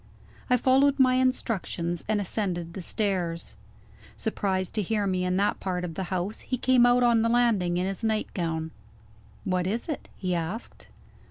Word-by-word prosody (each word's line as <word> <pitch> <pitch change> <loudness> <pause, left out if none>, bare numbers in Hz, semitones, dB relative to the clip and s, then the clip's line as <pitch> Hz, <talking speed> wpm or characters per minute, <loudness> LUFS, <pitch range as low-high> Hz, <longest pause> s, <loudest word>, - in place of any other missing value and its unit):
I 250 - +5
followed 270 +3 +4
my 255 -2 +5
instructions, 220 -9 -1
and 215 -1 +1
ascended 180 -4 -2
the 190 - -6
stairs. 180 -4 -2 0.6
Surprised 190 -4 -1
to 215 - 0
hear 210 +1 0
me 185 -2 0
in 180 0 0
that 200 +1 +1
part 180 -2 -2
of 170 -2 -4
the 190 +4 -3
house, 185 +3 -3
he 255 - -3
came 250 -1 +4
out 245 0 +4
on 235 -2 +4
the 230 - +2
landing 220 -8 +2
in 180 - 0
his 195 +3 -4
nightgown. 170 -7 -1 0.7
"What 180 -1 0
is 225 +5 -2
it?" 310 - -5
he 185 -2 -2
asked. 175 +7 -5
195 Hz, 170 wpm, -27 LUFS, 180-235 Hz, 0.7 s, I